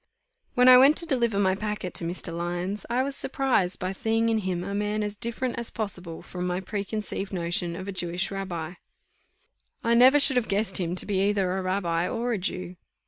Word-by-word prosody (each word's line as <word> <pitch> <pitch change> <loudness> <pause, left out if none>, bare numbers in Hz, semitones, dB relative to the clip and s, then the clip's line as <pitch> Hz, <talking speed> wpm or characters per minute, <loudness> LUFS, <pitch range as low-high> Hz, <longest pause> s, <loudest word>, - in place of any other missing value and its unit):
When 250 0 +5
I 250 0 +10
went 280 +4 +6
to 335 - +3
deliver 240 -8 +1
my 190 -2 +3
packet 210 -2 -4
to - - -1
Mr. 170 0 -4
Lyons, 175 +4 -3
I 245 +2 +1
was 275 0 -3
surprised 260 -11 0
by 185 +1 -2
seeing 225 +2 0
in 225 -1 +2
him 185 -3 -2
a 200 +2 -5
man 210 +1 -1
as 210 0 -4
different 235 +3 -3
as 235 - 0
possible 180 -6 -5
from 180 0 -5
my 180 0 -1
preconceived 200 +1 -4
notion 175 -1 -1
of 190 +2 -7
a - - -3
Jewish 180 0 -2
rabbi; 180 -4 -4 1.1
I 230 - +2
never 255 +5 +7
should 275 -2 +5
have 240 - +1
guessed 200 -1 0
him 175 -1 -2
to - - -2
be 195 -2 0
either 190 -3 0
a 190 - -1
rabbi, 180 -2 -1
or 240 0 -1
a 210 - -1
Jew. 180 0 -4
200 Hz, 205 wpm, -26 LUFS, 180-230 Hz, 1.1 s, I